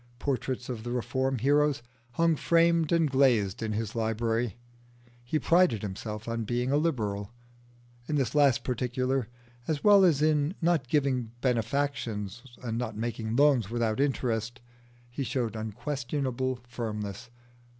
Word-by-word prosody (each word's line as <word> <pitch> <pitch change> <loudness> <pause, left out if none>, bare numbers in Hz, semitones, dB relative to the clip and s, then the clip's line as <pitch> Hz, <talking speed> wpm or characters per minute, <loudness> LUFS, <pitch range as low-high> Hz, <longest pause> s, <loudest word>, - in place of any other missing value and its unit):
Portraits 130 -2 -2
of 120 -4 -4
the 120 - -6
Reform 125 +2 -1
heroes 145 +2 +2 0.3
hung 165 +3 +3
framed 165 0 +3
and 165 -2 +3
glazed 120 -8 +3
in 110 -1 -2
his 110 0 -3
library: 115 0 -1 0.7
he 120 +6 -1
prided 170 - +3
himself 105 +2 -5
on 115 0 -2
being 120 +4 -1
a 145 - +3
Liberal. 105 -10 -1 0.8
In 155 - -1
this 135 -6 0
last 145 -4 +4
particular, 125 0 -1 0.4
as 150 -3 -1
well 205 -2 +7
as 155 -5 +4
in 155 +2 +2
not 165 -6 +1
giving 130 -4 0
benefactions 120 -4 -1 0.2
and 115 -1 -2
not 110 -3 -4
making 115 0 -3
loans 135 -6 +4
without 115 -1 -1
interest, 120 -4 -1 0.5
he 120 +3 -4
showed 120 -4 -2
unquestionable 130 +3 -2
firmness. 110 -2 -5
125 Hz, 135 wpm, -28 LUFS, 115-145 Hz, 0.8 s, well